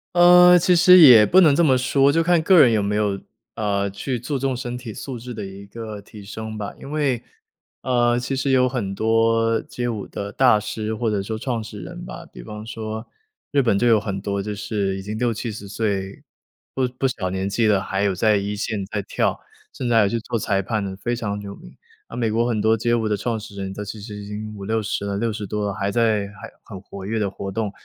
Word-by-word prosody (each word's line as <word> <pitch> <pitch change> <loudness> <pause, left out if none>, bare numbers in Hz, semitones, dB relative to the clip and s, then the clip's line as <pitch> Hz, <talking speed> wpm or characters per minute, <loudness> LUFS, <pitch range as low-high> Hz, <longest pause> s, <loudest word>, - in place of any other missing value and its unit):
呃， 180 0 +8
其 180 +1 +3
实 180 +2 +7
也 125 -9 +9
不 185 - +5
能 155 -6 +6
这 170 - +3
么 135 -5 +4
说， 135 +2 +3
就 165 +3 +2
看 170 0 +3
个 180 +2 +5
人 120 -5 +5
有 105 -2 +1
没 105 +1 -1
有， 105 -2 0 0.4
呃， 100 -2 -1
去 120 +6 -4
注 135 +4 -3
重 135 0 -1
身 125 -1 -5
体 120 -3 -8
素 130 +4 -6
质 125 +2 -8
的 105 -3 -6
一 95 +1 -10
个 110 0 -8
提 105 +1 -13
升 110 +2 -7
吧。 105 -1 -5
因 140 - -10
为， 140 -6 0 0.6
呃， 120 -1 +2
其 125 +2 -3
实 135 +1 0
有 130 -1 +4
很 120 -7 -3
多 115 +1 +2
街 120 0 -5
舞 110 -4 -3
的 100 - -6
大 125 -5 +4
师 110 +1 -4
或 110 +1 -1
者 100 -2 -1
说 110 +2 -4
创 120 -3 -3
始 105 -1 -9
人 90 - -8
吧， - - -9
比 - - -12
方 105 - -8
说 110 0 -6 0.4
日 145 - +3
本 115 -6 +2
就 120 - +2
有 110 -3 +4
很 100 -2 -4
多 100 0 -3
就 105 +1 -4
是 100 -2 -2
已 - - -6
经 105 +2 -5
60-70 110 -3 -3
岁 100 -2 -3 0.5
不 130 - 0
不 135 - +2
小 105 -8 -3
年 95 +1 -2
纪 105 +4 0
的， 105 -2 +3
还 95 +1 -2
有 100 -2 +1
在 105 +3 +2
一 100 +1 -2
线 105 -1 -3
在 105 -1 -3
跳， - - -1 0.3
甚 125 - -5
至 120 - +1
还 115 - +6
有 100 - +2
去 115 - -1
做 115 +1 -3
裁 100 -2 0
判 105 +1 -2
的 95 -1 -4
非 120 +5 -2
常 105 -3 -3
有 100 -1 -8
名。 - - -15 0.3
啊， 115 - -9
美 115 -2 0
国 115 +2 +1
很 115 -3 0
多 110 +1 +3
街 120 +2 0
舞 115 -2 +1
的 105 - +1
创 115 +2 -2
始 105 -1 -11
人， 95 -1 -5
都 100 - -7
其 105 +1 -7
实 105 0 -8
已 100 0 -8
经 105 +1 -6
50-60 105 0 -2
了、 100 -1 -2
60 110 0 -2
多 105 +1 -2
了， 100 - -2
还 100 +1 -2
在 110 -2 +1
还 105 +1 -11
很 95 -4 -9
活 95 -1 -10
跃 110 +3 -2
地 100 -2 0
活 100 0 -6
动， 105 +1 -3
110 Hz, 255 characters per minute, -22 LUFS, 100-120 Hz, 0.6 s, 也